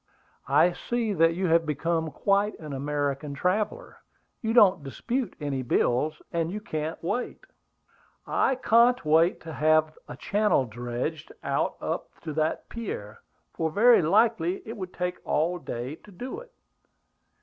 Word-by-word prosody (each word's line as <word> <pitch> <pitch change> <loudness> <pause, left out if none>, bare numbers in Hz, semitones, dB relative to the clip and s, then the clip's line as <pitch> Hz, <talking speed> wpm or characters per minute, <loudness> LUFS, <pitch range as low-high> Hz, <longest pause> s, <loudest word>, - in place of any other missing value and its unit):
"I 155 +6 +4
see 230 +3 -2
that 165 -2 +3
you 185 +2 -1
have 165 0 +4
become 160 +2 -1
quite 200 +7 +1
an 150 -3 -8
American 145 +1 -2
traveller; 210 - -1 0.4
you 225 - -1
don't 195 -9 +5
dispute 235 - -3
any 140 -3 -2
bills, 130 +4 +1
and 165 0 0
you 210 - -4
can't 155 -5 -4
wait." 245 +9 -3 0.8
"I 265 - +1
can't 240 -3 +4
wait 160 +3 +4
to 160 -1 -8
have 155 +2 +2
a - - -8
channel 210 -9 +2
dredged 120 +6 -5
out - - 0
up - - -5
to 155 -2 -5
that 155 +1 -1
pier, 190 - -6 0.3
for 160 - -1
very 230 +8 +5
likely 185 0 +2
it 225 - -5
would 185 -4 -6
take 180 0 -3
all 170 +4 0
day 130 0 -5
to 210 - -17
do 250 - -6
it." - - -14
165 Hz, 150 wpm, -27 LUFS, 150-210 Hz, 0.8 s, don't